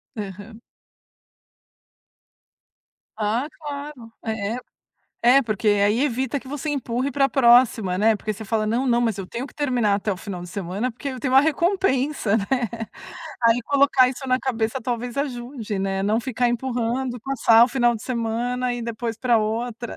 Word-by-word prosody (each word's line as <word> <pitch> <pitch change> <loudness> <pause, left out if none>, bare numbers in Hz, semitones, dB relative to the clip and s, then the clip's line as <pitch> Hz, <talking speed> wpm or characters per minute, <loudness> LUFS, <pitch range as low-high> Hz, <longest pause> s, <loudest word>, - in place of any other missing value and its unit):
Aham. 205 +2 -8 2.6
Ah, 220 +6 0
claro! 285 -6 -8
É 220 -1 -2
é - - -4 0.7
é 260 +3 +7
porque 215 -3 -2
aí 205 +3 +3
evita 265 -1 0
que 265 - -10
você 295 +2 -5
empurre 260 -1 -1
para 275 +1 +3
a - - -1
próxima, 235 -8 +4
né. 220 +2 +4
Porque 215 +1 -4
você 220 - -9
fala: 215 0 0
"Não, 235 +5 0
não, 240 0 +3
mas 225 -4 0
eu 195 - -5
tenho 240 +6 -5
que - - -18
terminar 245 -8 +1
até 205 +1 -2
o 185 - -3
final 185 -1 -6
de 180 - -8
semana, 200 +6 -3
porque 260 +4 -6
eu 255 - -6
tenho 260 +1 -1
uma 270 - +8
recompensa, 300 - +1
né." 200 - -2 1.0
Aí 230 +1 +4
colocar 275 -2 +4
isso 265 +1 -6
na 255 0 +2
cabeça 235 -1 -2
talvez 240 +1 -4
ajude, 245 -6 -4
né. 195 0 -1
Não 215 +4 +1
ficar 245 -1 0
empurrando 245 +1 -2
e 240 - -11
passar 230 -3 +4
o - - -2
final 240 -2 +2
de 220 - -7
semana 245 +1 -1
e 245 - -5
depois 230 0 -4
pra 245 -2 +3
outra. 230 +2 -3
240 Hz, 175 wpm, -23 LUFS, 220-260 Hz, 2.6 s, uma